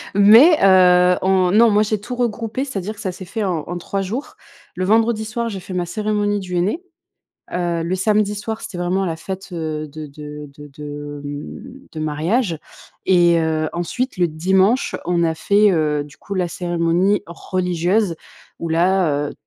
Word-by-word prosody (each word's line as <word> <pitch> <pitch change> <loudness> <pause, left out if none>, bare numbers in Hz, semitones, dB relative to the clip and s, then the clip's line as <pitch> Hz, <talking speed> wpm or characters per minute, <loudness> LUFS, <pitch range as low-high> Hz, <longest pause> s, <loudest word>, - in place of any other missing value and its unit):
mais, 225 - +8
heu, 180 -1 +5
on 185 -1 +2
non, 225 +4 +6
moi 210 +1 +4
j'ai 215 -1 -2
tout 245 +4 -6
regroupé, 235 +2 -2
c'est-à-dire 210 -5 -5
que - - -16
ça 185 - -3
s'est 185 - -9
fait 210 +4 -3
en 175 -5 -1
en 175 - -5
3 195 +3 -3
jours. 225 +9 -5 0.4
Le 185 - -2
vendredi 220 +2 +2
soir, 230 +2 -3
j'ai 195 -4 -5
fait 185 - -8
ma 175 -1 -1
cérémonie 205 +1 -1
du 180 -1 -5
henné, 205 - -1 0.7
heu, 175 -2 -1
le 170 +3 -1
samedi 210 +1 +1
soir, 220 +2 -5
c'était 210 -5 -7
vraiment 180 +2 0
la 165 -3 -2
fête, 190 +4 -7
heu, 155 -3 -4
de 155 +1 -8
de 150 0 -9
de 145 0 -11
de 145 -1 -7
mmh, 150 - -8
de 155 - -7
mariage 160 - -1 0.5
et 175 -2 +5
heu, 160 -1 0
ensuite 245 +10 -3
le 175 -1 +3
dimanche, 190 - +1
on 170 -1 +1
a 165 - +1
fait, 200 +5 +3
heu, 150 -3 +1
du 145 0 -15
coup, 200 - -7
la 180 -2 0
cérémonie 175 +4 0
religieuse 180 +2 -1 0.4
où 165 - -4
là, 165 -4 +2
heu, - - -10
185 Hz, 180 wpm, -20 LUFS, 165-210 Hz, 0.7 s, mais